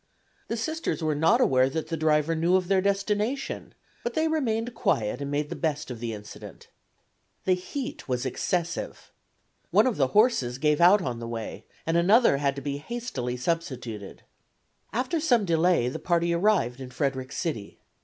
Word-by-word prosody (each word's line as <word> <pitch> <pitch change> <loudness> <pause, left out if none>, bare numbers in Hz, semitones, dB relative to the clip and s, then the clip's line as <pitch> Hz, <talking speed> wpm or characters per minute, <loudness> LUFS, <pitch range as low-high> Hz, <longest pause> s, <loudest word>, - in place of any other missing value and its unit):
The 230 - -2
Sisters 315 - -2
were 155 -1 +1
not 160 +3 +3
aware 130 0 +4
that 160 +2 -4
the 165 - -1
driver 155 0 +2
knew 170 +3 +2
of 185 -1 +1
their 195 -1 +4
destination, 205 +6 -1 0.3
but 240 - -3
they 315 0 +2
remained 240 -7 -1
quiet 115 - 0
and 140 - -3
made 145 +1 -1
the - - -3
best 150 -5 -2
of 120 - -6
the 115 -1 -3
incident. 105 -1 -10 0.8
The 185 - +4
heat 245 +9 -5
was 125 0 -1
excessive. 170 +6 -3 0.6
One - - +5
of 255 -4 0
the 135 - +3
horses 175 - +3
gave 150 +3 +2
out 185 +3 +6
on 125 -3 -3
the 115 - -6
way, 115 -1 -6 0.2
and 165 +1 +1
another 200 - +5
had 140 -1 0
to 140 - -7
be 140 0 -2
hastily 145 - -4
substituted. 125 - -4 0.7
After 255 +7 -1
some 245 -9 +3
delay 170 -5 +3
the 125 - -3
party 170 -1 +1
arrived 170 - +2
in 130 - -7
Frederick 130 0 -2
City. 145 - -4
165 Hz, 175 wpm, -27 LUFS, 130-205 Hz, 0.8 s, out